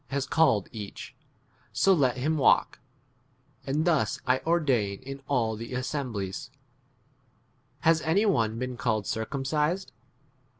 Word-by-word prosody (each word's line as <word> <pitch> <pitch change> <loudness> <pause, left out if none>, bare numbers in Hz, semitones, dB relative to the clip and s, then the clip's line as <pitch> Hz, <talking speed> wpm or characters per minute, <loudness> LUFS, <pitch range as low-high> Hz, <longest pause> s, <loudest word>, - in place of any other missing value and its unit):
GodP - - -9
lias 140 -1 0
called 140 - +3
each, 105 -3 -8 0.6
so 195 - +4
let 130 -7 +2
him 150 +5 0
walk; 140 - +3 0.9
and 150 +4 0
thus 155 -4 +1
I 130 0 +2
ordain 130 -12 +1
in 135 +1 -7
all 120 -5 +1
18 - - -10
the 125 - -5
assemblies. 125 -8 -4 1.3
Has 160 0 +4
any 185 +8 +2
one 115 - +1
been 125 0 -4
called 110 -5 0
circumcised 150 - -1
135 Hz, 130 wpm, -27 LUFS, 115-155 Hz, 1.3 s, so